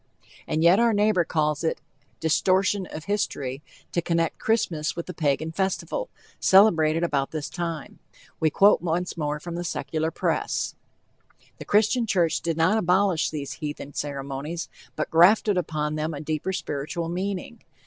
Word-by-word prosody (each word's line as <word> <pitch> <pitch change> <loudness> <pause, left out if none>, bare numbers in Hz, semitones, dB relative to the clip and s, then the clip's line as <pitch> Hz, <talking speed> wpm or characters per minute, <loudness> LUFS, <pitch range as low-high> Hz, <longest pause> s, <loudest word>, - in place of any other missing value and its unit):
And 160 - 0
yet 175 +4 +6
our 235 -1 +4
neighbor 205 -3 +3
calls 150 -2 0
it 160 - 0 0.4
"distortion 185 +4 +2
of 155 - -8
history" 140 -9 -2 0.3
to 170 - 0
connect 165 -1 0
Christmas 175 -9 0
with 170 - -4
the 180 - -7
Pagan 155 0 0
festival, 195 - -2 0.3
celebrated 165 -5 +5
about 140 -5 0
this 155 -2 -5
time. 165 -4 -5 0.4
We 160 - +3
quote 200 +5 +5
once 175 +1 -1
more 150 -2 -2
from 170 +2 -7
the 175 +1 -3
Secular 160 -2 -2
press: 165 - -1 0.9
The - - -8
Christian 220 +3 +2
church 175 -5 +1
did 165 -1 -2
not 185 +7 +3
abolish 185 -2 +2
these 140 -4 -5
heathen 145 -1 -5
ceremonies, 140 +4 -4 0.3
but - - -3
grafted 195 +5 +5
upon 155 -4 -1
them 155 +1 -2
a - - -6
deeper 155 +4 -2
spiritual 165 -1 -3
meaning. 195 +5 -4
165 Hz, 150 wpm, -25 LUFS, 155-190 Hz, 0.9 s, yet